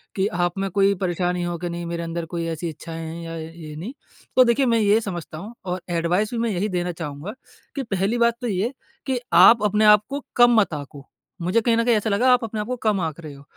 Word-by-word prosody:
कि 195 0 +1
आप 175 -1 -1
में 195 0 -1
कोई 195 +1 +3
परेशानी 180 -1 -1
हो 175 0 -3
कि 175 +1 -4
नहीं 170 0 -5
मेरे 170 0 -4
अंदर 165 0 -4
कोई 170 0 -4
ऐसी 165 +1 -3
इच्छाएँ 165 +1 -7
हैं 165 +1 -6
या 165 0 -6
य 160 0 -7
ये 155 -3 -9
नहीं। 185 - -6 0.4
तो 255 - +8
देखिए 250 +3 +2
मैं 230 -2 +3
ये 210 +1 +4
समझता 175 -6 -6
हूँ 210 +7 -8
और 180 0 -3
एडवाइस 175 +5 0
भी - - -2
मैं 230 0 0
यही 200 +2 -1
देना 180 -1 -1
चाहूँगा 160 +3 -6 0.4
कि 275 - -2
पहली 200 +1 -1
बात 235 0 +3
तो 245 - -2
ये 195 -1 0
है 255 - -8 0.3
कि 260 -2 -1
आप 200 +6 +7
अपने 210 +1 +2
आप 210 0 +7
को 285 +1 -5
कम 240 -2 +6
मत 195 -6 +1
आको। 145 -1 -8 0.3
मुझे 185 +7 +2
कहीं 230 0 +2
ना 230 - +2
कहीं 240 - +4
ऐसा 215 +1 0
लगा 225 +6 +3
आप 245 - +2
अपने 220 -1 -4
आप 210 - -3
को 250 - -2
कम 210 -3 +1
आक 160 -1 -3
रहे 150 -3 -9
हो, 140 - -14
190 Hz, 260 wpm, -23 LUFS, 170-225 Hz, 0.4 s, तो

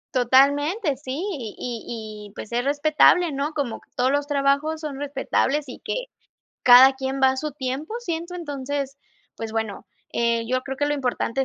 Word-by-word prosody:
Totalmente, 285 - +3
sí 260 0 -8 0.2
y 250 - -6
y 220 -3 -6
y - - -18
pues, 215 - -8
es 240 +1 +1
respetable, 305 +4 +4
¿no? 280 +3 -2
Como 280 -7 -3 0.2
todos 255 +1 +2
los 285 0 0
trabajos 285 +2 +1
son 300 -3 -5
respetables 285 +1 0
y 250 - -9
que - - -3 0.6
cada 255 +2 +9
quien 265 0 -3
va 265 0 +5
su 305 +3 -3
tiempo, 270 +6 -4
siento 345 -5 -4
entonces 285 -4 -4 0.4
pues, 225 -1 -6
bueno, 220 -3 -3 0.3
eh, 235 -1 0
yo 255 +2 0
creo 270 0 -6
que 290 - +1
lo 295 - +1
importante 265 -1 -1
275 Hz, 170 wpm, -23 LUFS, 250-295 Hz, 0.6 s, cada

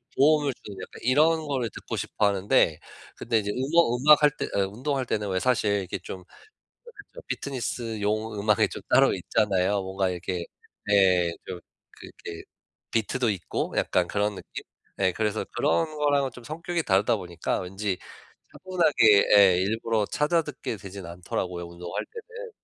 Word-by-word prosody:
도움을 145 -1 +4
주는 100 -2 -9
약간 90 - -9
이런 155 +5 +3
거를 130 -5 -1
듣고 - - -6
싶어 105 - 0
하는데 100 -4 +2 0.4
근데 115 - +1
이제 105 - -4
음어 135 +1 +2
음악 150 +4 +6
할 150 - +6
때 - - -2
어 100 -1 +2
운동할 130 +6 -2
때는 105 -2 -2
왜 95 -1 0
사실 120 -4 +1
이렇게 95 -2 -4
좀 90 +1 -8 0.6
그게 475 -3 -16 0.2
좀 - - -10
피트니스용 110 -5 -3
음악이 105 0 +3
좀 - - -7
따로 - - +5
있잖아요. 100 -1 +1
뭔가 95 0 -1
이렇게 90 -1 -4 0.4
네. 95 -4 +4
좀 90 -1 -6 0.4
그 - - -10 0.2
이렇게 85 - -7 0.5
비트도 115 +2 0
있고 95 -4 -4
약간 90 -1 +1
그런 105 0 -1
느낌? - - -9 0.3
네 95 -1 +2
그래서 110 +1 -1
그런 155 +1 +1
거랑은 145 -2 +2
좀 125 - -13
성격이 165 +5 -3
다르다 105 +2 +2
보니까 85 -3 -3
왠지 95 +1 -3 0.5
차분하게 155 - +3
예. 95 -3 +7
일부러 110 +2 0
찾아 160 +3 +2
듣게 150 -7 -6
되진 95 +1 -9
않더라고요 85 +1 -4
운동할 85 0 -6
때는. 470 +1 -10
105 Hz, 335 characters per minute, -26 LUFS, 95-140 Hz, 0.6 s, 예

